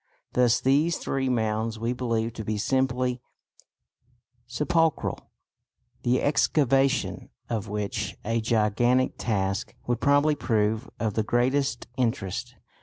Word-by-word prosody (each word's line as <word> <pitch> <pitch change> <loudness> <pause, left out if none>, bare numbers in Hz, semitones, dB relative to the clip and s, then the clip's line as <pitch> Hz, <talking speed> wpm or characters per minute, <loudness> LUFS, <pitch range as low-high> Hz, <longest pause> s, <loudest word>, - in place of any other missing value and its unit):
Thus 125 -2 +4
these 150 +5 +2
three 135 -1 -1
mounds 110 -1 0
we 115 +2 -1
believe 115 -2 -1
to 110 - -6
be 105 0 -2
simply 125 +1 0 1.3
sepulchral, 160 +5 0 0.7
the 125 +1 +1
excavation 135 -2 +2 0.2
of 110 -2 -2
which 105 0 -3
a 115 +1 0
gigantic 120 +3 +2
task 100 -3 -1
would 120 -1 -1
probably 145 +2 +4
prove 110 -3 0
of 110 -2 -1
the 110 - +1
greatest 120 +3 0
interest. 115 -7 -2
120 Hz, 110 wpm, -26 LUFS, 110-130 Hz, 1.3 s, Thus